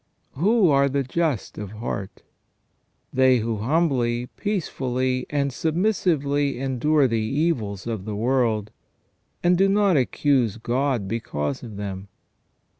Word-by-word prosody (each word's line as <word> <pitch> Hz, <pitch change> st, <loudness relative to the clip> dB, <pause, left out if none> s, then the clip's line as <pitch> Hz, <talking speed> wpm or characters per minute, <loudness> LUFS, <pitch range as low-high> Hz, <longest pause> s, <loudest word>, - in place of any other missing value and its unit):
Who 200 Hz, -, +3 dB
are 140 Hz, -1 st, +4 dB
the 140 Hz, +1 st, 0 dB
just 145 Hz, -4 st, -2 dB
of 105 Hz, -1 st, -6 dB
heart? 105 Hz, -3 st, -5 dB, 0.9 s
They 130 Hz, -1 st, +5 dB
who 115 Hz, -1 st, -2 dB
humbly, 125 Hz, -2 st, 0 dB
peacefully, 130 Hz, -, -2 dB
and 140 Hz, -2 st, 0 dB
submissively 155 Hz, -, 0 dB
endure 135 Hz, +2 st, +2 dB
the 115 Hz, -2 st, 0 dB
evils 110 Hz, -, -1 dB
of 110 Hz, -5 st, -4 dB
the 105 Hz, -1 st, -4 dB
world, 115 Hz, -2 st, 0 dB, 0.7 s
and 175 Hz, +1 st, +4 dB
do 195 Hz, +2 st, +3 dB
not 200 Hz, -4 st, +3 dB
accuse 130 Hz, -4 st, +1 dB
God 120 Hz, -2 st, -1 dB
because 110 Hz, -, -3 dB
of 110 Hz, -5 st, -9 dB
them. 100 Hz, -1 st, -5 dB
130 Hz, 120 wpm, -24 LUFS, 115-150 Hz, 0.9 s, They